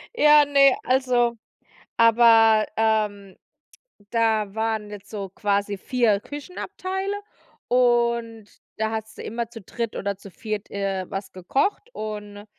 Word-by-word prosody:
Ja, 300 -5 +6
ne, 275 -2 +5
also 245 -2 +1 0.6
aber, 225 -1 +6
ähm, 210 -3 0 0.7
da 220 -3 +1
waren 220 -1 -2
jetzt 205 0 -10
so 200 -3 -5
quasi 200 0 -1
4 230 -3 +1
Küchenabteile 370 - -5 0.6
und 235 -3 +1 0.3
da 220 0 -1
hattest 220 0 -6
du - - -6
immer 230 0 -4
zu 230 -2 -10
dritt 230 +4 -5
oder 200 0 -2
zu 200 0 -13
viert, 215 +2 -5
äh, 195 -2 -2
was 195 +1 -6
gekocht 275 - -1
und, 210 -1 -7
220 Hz, 125 wpm, -24 LUFS, 205-240 Hz, 0.7 s, Ja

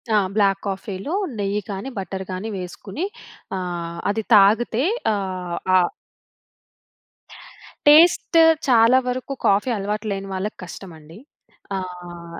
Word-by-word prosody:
ఆ! - - +6 0.2
బ్లాక్ 195 -2 +3
కాఫీలో 195 - -4 0.3
నెయ్యి 200 +1 -1
కానీ, 200 +6 -5
బట్టర్‌ 190 0 -5
గాని 185 +4 -4
వేసుకొని 190 - -6 0.5
ఆహ్, 170 -2 -5
అది 220 +2 -2
తాగితే 220 +4 +4 0.3
ఆహ్, 185 -3 -4 0.2
ఆహ్ 180 -1 +3 2.0
టేస్ట్ 330 +3 +6 0.3
చాలా 235 0 +5
వరకు 255 +2 -3
కాఫీ 200 +5 +3
అలవాటు 210 +2 -3
లేని 195 0 -4
వాళ్ళకి 190 +3 -4
కష్టమండి. 165 -3 -11 0.6
ఆహ్, 175 -2 -8
195 Hz, 105 wpm, -22 LUFS, 180-220 Hz, 2.0 s, ఆ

